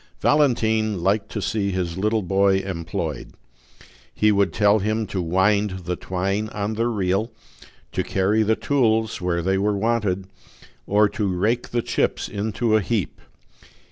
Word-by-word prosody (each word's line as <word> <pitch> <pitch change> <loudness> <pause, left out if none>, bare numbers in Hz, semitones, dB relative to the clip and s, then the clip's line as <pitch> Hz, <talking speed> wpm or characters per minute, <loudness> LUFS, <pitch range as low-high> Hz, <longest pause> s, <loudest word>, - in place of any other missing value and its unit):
Valentine 110 - +2
liked 100 +2 +1
to 110 - -3
see 105 -3 -1
his 90 -3 -2
little 105 +3 0
boy 95 +1 +3
employed. 85 -6 -4 0.8
He 105 0 +3
would 100 -1 +2
tell 105 0 +3
him 110 +2 -1
to 95 -2 -3
wind 95 +2 +1
the 90 - -1
twine 100 +4 -2
on 105 +1 -2
the 115 +2 0
reel, 105 0 0 0.6
to - - -1
carry 100 +3 +1
the 110 +1 +2
tools 110 -7 +1
where 85 -1 -1
they 95 +2 +1
were 105 +1 +1
wanted, 105 -4 0 0.6
or 105 +1 +4
to 105 0 -2
rake 105 +7 0
the 120 -1 -1
chips - - -1
into 110 +2 -1
a 110 - +3
heap. 105 -2 -2
105 Hz, 150 wpm, -23 LUFS, 95-110 Hz, 0.8 s, or